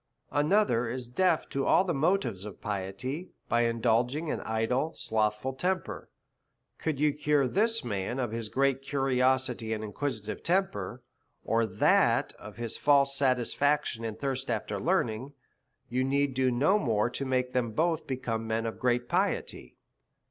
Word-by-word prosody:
Another 145 Hz, -, +2 dB
is 125 Hz, 0 st, -4 dB
deaf 170 Hz, +6 st, +1 dB
to 135 Hz, 0 st, -1 dB
all -, -, +5 dB
the 180 Hz, -3 st, -1 dB
motives 145 Hz, -, +1 dB
to 105 Hz, 0 st, -6 dB
piety, 105 Hz, -, -4 dB, 0.2 s
by 120 Hz, 0 st, +2 dB
indulging 120 Hz, +6 st, +1 dB
an -, -, -2 dB
idle, 115 Hz, +7 st, -1 dB
slothful 110 Hz, +3 st, -1 dB
temper. 180 Hz, +6 st, -2 dB, 0.7 s
Could 155 Hz, -4 st, -2 dB
you 150 Hz, -1 st, +3 dB
cure 145 Hz, -2 st, +2 dB
this 225 Hz, -, +1 dB
man 105 Hz, +2 st, -2 dB
of 125 Hz, -4 st, -1 dB
his 115 Hz, -1 st, -4 dB
great 135 Hz, +1 st, +1 dB
curiosity 130 Hz, -4 st, +1 dB
and 110 Hz, -1 st, -4 dB
inquisitive 110 Hz, -1 st, -4 dB
temper, 125 Hz, -, -1 dB, 0.4 s
or 115 Hz, 0 st, +2 dB
that 100 Hz, 0 st, +3 dB
of 105 Hz, 0 st, -11 dB
his 115 Hz, -1 st, -3 dB
false 140 Hz, -1 st, +4 dB
satisfaction 140 Hz, 0 st, +1 dB
and 110 Hz, -1 st, -4 dB
thirst 135 Hz, -2 st, -3 dB
after 105 Hz, -3 st, -2 dB
learning, 135 Hz, -, 0 dB, 0.5 s
you 125 Hz, +2 st, 0 dB
need 140 Hz, +1 st, +1 dB
do 130 Hz, 0 st, +2 dB
no 145 Hz, +12 st, +3 dB
more 115 Hz, -, +1 dB
to 140 Hz, -, -3 dB
make 130 Hz, -1 st, 0 dB
them 125 Hz, -2 st, +1 dB
both 160 Hz, +6 st, 0 dB
become 115 Hz, -4 st, -3 dB
men 110 Hz, +1 st, -1 dB
of 115 Hz, -, -4 dB
great 120 Hz, -1 st, +1 dB
piety. 60 Hz, -, -1 dB
125 Hz, 150 wpm, -29 LUFS, 115-145 Hz, 0.7 s, all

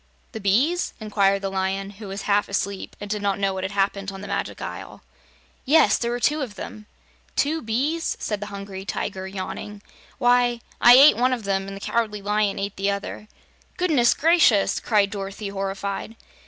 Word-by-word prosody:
"The 220 Hz, -, -6 dB
bees?" 255 Hz, -, +1 dB
inquired 200 Hz, -2 st, +1 dB
the 195 Hz, -, -2 dB
Lion, 195 Hz, +1 st, -2 dB
who 205 Hz, +1 st, -10 dB
was 195 Hz, +2 st, -5 dB
half 205 Hz, 0 st, +1 dB
asleep 200 Hz, 0 st, -3 dB
and 205 Hz, -, -6 dB
did 210 Hz, 0 st, -3 dB
not 200 Hz, -1 st, 0 dB
know 195 Hz, -1 st, 0 dB
what 190 Hz, 0 st, -4 dB
had 190 Hz, -, -2 dB
happened 195 Hz, 0 st, 0 dB
on 195 Hz, 0 st, -9 dB
the 205 Hz, -, -7 dB
Magic -, -, -3 dB
Isle. -, -, -8 dB, 0.6 s
"Yes; 310 Hz, +4 st, +4 dB
there 235 Hz, -, -1 dB
were 240 Hz, +1 st, -2 dB
two 300 Hz, +5 st, +1 dB
of 235 Hz, -7 st, -5 dB
them." 210 Hz, +2 st, -8 dB, 0.5 s
"Two 315 Hz, +3 st, +1 dB
bees?" 275 Hz, +9 st, -1 dB
said 210 Hz, -2 st, -3 dB
the 205 Hz, -, -6 dB
Hungry 200 Hz, -1 st, -7 dB
Tiger, 190 Hz, -1 st, -4 dB
yawning. 200 Hz, +2 st, -6 dB, 0.3 s
"Why, 245 Hz, -1 st, +3 dB, 0.2 s
I 240 Hz, -, +9 dB
ate 275 Hz, -3 st, +8 dB
one 255 Hz, +2 st, +2 dB
of 240 Hz, -3 st, -3 dB
them 195 Hz, -1 st, -1 dB
and 195 Hz, 0 st, -7 dB
the -, -, -11 dB
Cowardly 210 Hz, -3 st, -1 dB
Lion 210 Hz, 0 st, +1 dB
ate 200 Hz, 0 st, -4 dB
the 195 Hz, +1 st, 0 dB
other." 200 Hz, +1 st, -4 dB, 0.5 s
"Goodness 305 Hz, -10 st, +3 dB
gracious!" 310 Hz, -, +4 dB
cried 205 Hz, -3 st, +2 dB
Dorothy 200 Hz, 0 st, -5 dB
horrified. 195 Hz, +2 st, -4 dB
205 Hz, 185 wpm, -23 LUFS, 195-235 Hz, 0.6 s, I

